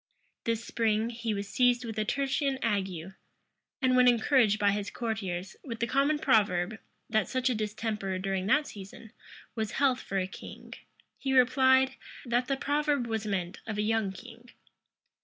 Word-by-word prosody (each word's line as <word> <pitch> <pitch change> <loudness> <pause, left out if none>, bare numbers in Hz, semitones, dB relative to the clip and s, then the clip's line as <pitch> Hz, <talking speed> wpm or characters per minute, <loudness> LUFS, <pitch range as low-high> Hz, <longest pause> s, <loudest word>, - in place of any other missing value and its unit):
This 230 0 -1
spring, 225 0 0
he 230 -1 -3
was 200 -1 -3
seized 245 +1 +2
with 225 -2 -5
a - - +2
tertian 275 +3 0
ague; 190 -5 -2 0.7
and, 255 -1 +4
when 250 0 +6
encouraged 235 -2 +4
by 205 -1 +3
his 205 0 -2
courtiers 195 -6 -4
with 230 -4 -6
the 235 - +1
common 275 +5 +2
proverb, 210 -5 +2 0.3
that 215 -2 +1
such 255 0 0
a - - +1
distemper, 210 -3 -3
during 190 0 -2
that 295 +8 +3
season, 205 0 -10 0.4
was 220 -2 -3
health 265 -3 +2
for 195 - -4
a 185 - +1
king, 190 - -10 0.5
he 270 -1 -1
replied, 260 +1 +4 0.3
that 245 +1 0
the 275 - 0
proverb 290 -2 0
was 220 -2 -3
meant 185 -3 -2
of 215 -2 -3
a 210 - +1
young 220 -2 +1
king. 235 +5 -13
225 Hz, 165 wpm, -29 LUFS, 205-255 Hz, 0.7 s, when